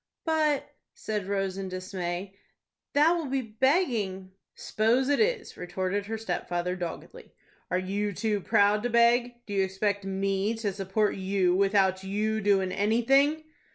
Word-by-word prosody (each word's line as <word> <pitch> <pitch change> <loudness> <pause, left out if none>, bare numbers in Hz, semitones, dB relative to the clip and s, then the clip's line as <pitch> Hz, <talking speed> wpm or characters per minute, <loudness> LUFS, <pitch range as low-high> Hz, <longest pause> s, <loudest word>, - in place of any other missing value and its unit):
'" - - -63
"But," 305 -3 +1 0.3
said 210 -3 -4
Rose, 195 -1 -2
in 190 -1 -4
dismay, 185 0 -4 0.6
"that 300 +3 +5
will 335 -4 -1
be 265 0 -1
begging." 220 - 0 0.2
"S'pose 240 +5 +1
it 285 - +2
is," 450 -1 0
retorted 185 +3 -3
her 225 +1 -3
stepfather, 180 -3 -2
doggedly. 175 -2 -8 0.3
"Are 180 - +1
you 200 +3 -2
too 210 +1 -1
proud 205 +3 +3
to 245 - -1
beg? 240 +1 +2
Do 205 - -7
you 195 -1 +2
expect 200 +1 -1
me 195 +2 -1
to 215 -3 -2
support 195 +2 0
you 190 -1 +1
without 195 -1 +2
you 215 +3 -1
doin' 195 -2 +2
anything?" 270 +10 +2
205 Hz, 150 wpm, -28 LUFS, 190-235 Hz, 0.6 s, that